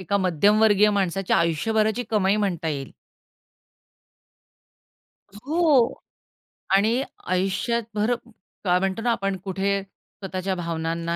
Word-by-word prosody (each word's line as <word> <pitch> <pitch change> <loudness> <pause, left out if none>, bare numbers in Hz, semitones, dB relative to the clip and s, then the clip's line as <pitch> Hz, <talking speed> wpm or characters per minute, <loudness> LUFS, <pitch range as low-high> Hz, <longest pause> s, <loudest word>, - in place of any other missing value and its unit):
एका 190 +2 -1
मध्यमवर्गीय 205 +3 +4
माणसाच्या 195 -2 0
आयुष्यभराची 215 +8 +1
कमाई 205 -2 +2
म्हणता 185 -6 -1
येईल. 140 -3 -4 2.6
हो 305 -7 +3 0.8
आणि 220 +6 +2 0.3
आयुष्यभर 195 +6 0 0.8
काय 180 -2 +3
म्हणतो 195 +3 -2
ना 240 +1 +1
आपण 195 -4 -1
कुठे 195 +1 -1
स्वतःच्या 190 -1 -6
भावनांना 165 -1 -3
195 Hz, 90 wpm, -24 LUFS, 180-215 Hz, 2.6 s, मध्यमवर्गीय